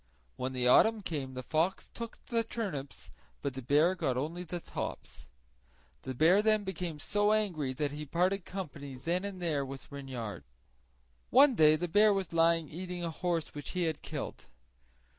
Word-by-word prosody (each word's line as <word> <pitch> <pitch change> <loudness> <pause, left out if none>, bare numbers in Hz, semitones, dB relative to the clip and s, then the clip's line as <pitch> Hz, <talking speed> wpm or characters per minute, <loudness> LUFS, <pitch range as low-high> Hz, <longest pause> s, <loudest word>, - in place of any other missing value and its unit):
When 130 +1 -3
the 125 -1 0
autumn 220 - +5
came 135 -7 -4
the 130 - -5
fox 160 +8 0
took 230 -1 -6
the 230 -1 +1
turnips, 190 - -5 0.3
but 140 - -1
the 130 - -6
bear 150 +8 +3
only 150 +8 -1
got 170 - -16
the - - -16
tops. - - -6 0.7
The 130 -1 -5
bear 170 - +5
then 215 -1 +3
became 180 -4 -4
so 205 +7 +2
angry 175 -11 0
that 145 +2 -1
he 150 +1 -6
parted 180 +5 +1
company 145 -8 -6
then 170 +8 -1
and 200 -2 -5
there 160 -5 0
with 135 +1 -8
Reynard. 130 - -6 0.9
One 275 +2 +7
day 155 -7 +6
the 175 +3 -2
bear 205 +4 +5
was 190 -4 -3
lying 165 -1 +3
eating 180 +3 -6
a 165 - -2
horse 170 -1 -2
which 145 -1 -6
he 180 -1 0
had 160 -3 -1
killed. - - -6
165 Hz, 175 wpm, -31 LUFS, 140-190 Hz, 0.9 s, One